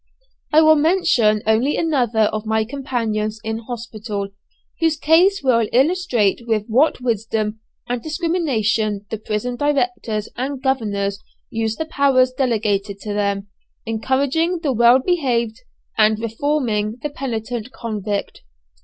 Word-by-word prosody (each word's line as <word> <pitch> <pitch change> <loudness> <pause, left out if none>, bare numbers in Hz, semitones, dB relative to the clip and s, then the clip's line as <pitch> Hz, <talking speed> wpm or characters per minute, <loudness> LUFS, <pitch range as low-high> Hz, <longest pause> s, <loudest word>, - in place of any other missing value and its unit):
"I 310 +1 +6
will 315 0 +6
mention 290 - +3
only 225 +7 +2
another 250 -9 +1
of 215 0 0
my 220 0 +1
companions 225 -5 -2
in 220 0 -3
hospital, 220 -3 -5 0.5
whose 325 -2 +2
case 345 +6 +4
will 230 -4 +3
illustrate 260 - +2
with 215 -2 0
what 250 +4 +2
wisdom 220 -2 -1 0.3
and 245 -1 -2
discrimination 230 - 0
the 220 - -3
prison 220 +3 -3
directors 245 -7 -1
and 265 +2 -3
governors 205 -7 -1 0.3
use 225 -1 -1
the 320 - -3
powers 275 -4 +3
delegated 210 -6 0
to 210 - -4
them, 200 -1 -1 0.4
encouraging 280 +10 0
the 280 -4 +1
well 240 +2 +6
behaved 255 -7 0 0.4
and 215 0 +5
reforming 225 -2 -1
the 295 - -2
penitent 240 -3 -4
convict!" 210 -4 -4
235 Hz, 125 wpm, -20 LUFS, 215-280 Hz, 0.5 s, I